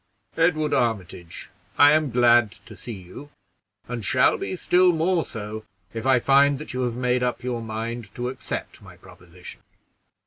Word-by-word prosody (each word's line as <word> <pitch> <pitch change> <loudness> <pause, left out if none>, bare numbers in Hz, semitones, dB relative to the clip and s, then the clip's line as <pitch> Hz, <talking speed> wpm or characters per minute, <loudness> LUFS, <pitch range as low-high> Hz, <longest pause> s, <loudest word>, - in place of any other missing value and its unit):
"Edward 160 -2 +1
Armitage, 95 -7 -3 0.3
I 145 0 +7
am 155 -1 +2
glad 120 -3 +4
to 115 -2 -14
see 120 - -9
you, 95 +8 -10 0.6
and 120 -2 -5
shall 130 +6 +3
be - - -4
still 180 0 +3
more 165 +1 +1
so 110 -1 -7 0.3
if 115 +2 -4
I 130 -2 +4
find 140 +2 +4
that 150 -1 -8
you 130 - -2
have 120 -1 -3
made 125 0 0
up 125 -1 -2
your 125 -2 -3
mind 115 0 -5
to 125 0 -3
accept 125 -4 -6
my - - -15
proposition. 90 0 -13
125 Hz, 165 wpm, -24 LUFS, 110-140 Hz, 0.6 s, I